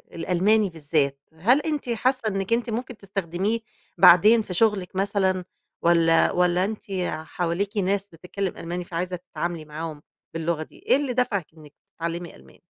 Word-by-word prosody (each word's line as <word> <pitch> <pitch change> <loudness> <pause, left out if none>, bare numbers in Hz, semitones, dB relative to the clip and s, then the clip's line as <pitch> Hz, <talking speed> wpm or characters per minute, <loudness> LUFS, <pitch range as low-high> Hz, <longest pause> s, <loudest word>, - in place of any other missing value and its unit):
الألماني 190 +5 +2
بالذات؟ 145 -4 -1
هل 215 - +3
أنتِ 300 -5 -3
حاسة 255 +3 +1
إنِك 195 +1 -1
أنتِ 235 +1 0
ممكن 240 +1 -4
تستخدميه 195 +2 -2 0.4
بعدين 210 +7 +7
في 200 -4 -6
شغلِك 195 -2 +1
مثلًا 190 -2 0 0.4
والّا 165 -1 +4
والّا 180 +1 +2
أنتِ 215 +1 -5 0.4
حواليكِ 180 +5 -2
ناس 200 0 0
بتتكلم 180 +2 -5
ألماني 175 +1 -4
فعايزة 180 +2 -3
تتعاملي 170 -2 -5
معاهم 155 0 -6 0.3
باللغة 165 -1 -1
دي - - -17
إيه - - +3
اللي 275 -2 -1
دفعِك 235 -8 0
إنِك 150 -2 -15 0.2
تتعلمي 170 +1 -4
ألماني؟ - - -19
185 Hz, 145 wpm, -24 LUFS, 170-210 Hz, 0.4 s, بعدين